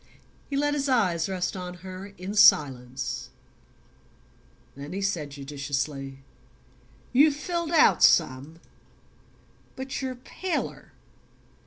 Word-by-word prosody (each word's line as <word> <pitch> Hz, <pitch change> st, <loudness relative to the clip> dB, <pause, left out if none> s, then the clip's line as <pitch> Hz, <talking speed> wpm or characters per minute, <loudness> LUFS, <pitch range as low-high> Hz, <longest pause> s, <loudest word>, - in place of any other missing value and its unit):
He 275 Hz, -, -2 dB
let 290 Hz, +1 st, +1 dB
his 285 Hz, -1 st, -1 dB
eyes 185 Hz, -9 st, +2 dB
rest 185 Hz, -1 st, -2 dB
on 180 Hz, -1 st, -6 dB
her 185 Hz, +1 st, -7 dB
in 185 Hz, +3 st, -6 dB
silence; 135 Hz, -10 st, +3 dB, 1.5 s
then 140 Hz, +4 st, -8 dB
he 195 Hz, -, -3 dB
said 170 Hz, -7 st, -1 dB
judicially: 140 Hz, -1 st, -4 dB, 0.9 s
"You've 285 Hz, +3 st, +5 dB
filled 340 Hz, +2 st, -3 dB
out 330 Hz, -2 st, +5 dB
some; 155 Hz, +1 st, +3 dB, 1.2 s
but 265 Hz, +1 st, -5 dB
you're 260 Hz, -1 st, -3 dB
paler." 345 Hz, +8 st, -5 dB
185 Hz, 105 wpm, -26 LUFS, -, 1.5 s, You've